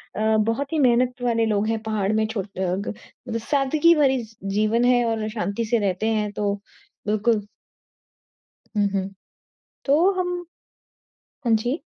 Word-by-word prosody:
अ, - - -4 0.2
बहुत 230 +7 0
ही - - +1
मेहनत 250 -1 +2
वाले 230 -2 +2
लोग 210 0 +1
हैं 225 0 0
पहाड़ 215 -2 0
में। 220 0 +2
छो 220 -3 -2
अ, - - -8
ग 190 +4 -4
सादगी 295 +4 +4
भरी 265 -4 +2
स 220 0 -20 0.2
जीवन 215 +3 +2
है 245 -1 +4
और 220 -1 -1
शांति 215 0 -2
से 230 +1 +1
रहते 200 +1 0
हैं 210 -1 -1
तो 205 -1 -1 0.5
बिल्कुल। 215 0 +1 1.3
हुँ, 205 -1 +3
हुँ। 195 0 -1 0.8
तो 315 +7 +4
हम 360 -1 -1 1.1
हाँ 230 -2 +4
जी। 245 +8 -2
225 Hz, 150 wpm, -23 LUFS, 210-250 Hz, 1.3 s, सादगी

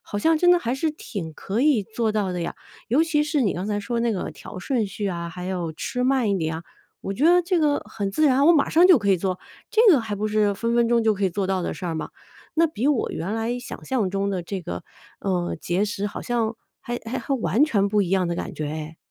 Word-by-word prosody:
好 - - -6
像 320 +8 +3
真 355 +2 +5
的 355 - +6
还 240 -6 -2
是 310 +4 0
挺 195 - -7
可 200 +8 -3
以 275 -6 +4
做 220 +2 -1
到 205 -3 -1
的 180 - -3
呀。 170 - -3 0.3
尤 280 +8 +4
其 310 -2 +1
是 300 -2 0
你 205 - +2
刚 185 +3 -4
才 210 -1 -1
说 230 +3 -2
那 235 0 +1
个 200 - -3
调 - - -10
顺 225 +3 0
序 200 +1 -4
啊， 170 -2 -3
还 180 +2 -7
有 180 -3 -2
吃 250 +9 -3
慢 255 -4 +2
一 195 - +1
点 160 -1 -2
啊， 165 - -7 0.4
我 195 - -3
觉 255 +9 -1
得 355 +1 +6
这 355 0 +1
个 295 -2 +2
很 200 -3 -4
自 305 +10 +2
然， 275 +1 +4
我 340 - +8
马 290 - +2
上 340 +3 +6
就 365 -3 +8
可 200 -2 0
以 190 - +4
做， 185 0 -2 0.3
这 450 - +4
个 285 - +4
还 220 -2 -4
不 205 +1 -2
是 210 -1 +2
分 230 +4 -1
分 235 -1 +3
钟 235 -1 +3
就 220 - +4
可 200 0 -2
以 - - -1
做 195 +2 -1
到 190 -1 0
的 - - -3
事 - - -8
儿 170 -2 -2
嘛！ 160 - -4 0.5
那 330 - +6
比 285 -4 -1
我 285 -5 +1
原 180 +7 -3
来 225 +2 -1
想 245 - -8
象 245 -7 0
中 195 +1 -1
的 185 -3 -2
这 185 +1 -5
个， 90 - -5 0.4
呃， 180 -3 -1
节 180 +4 0
食 205 -1 -3
好 205 - -6
像 230 -2 -1 0.2
还 240 0 -4
还 240 +4 -3
还 275 -2 -2
完 220 - +2
全 200 -9 +2
不 210 +1 +2
一 190 - 0
样 190 0 +2
的 170 - -1
感 - - -5
觉 155 - -3
哎。 155 +1 -6
210 Hz, 290 characters per minute, -24 LUFS, 185-255 Hz, 0.5 s, 我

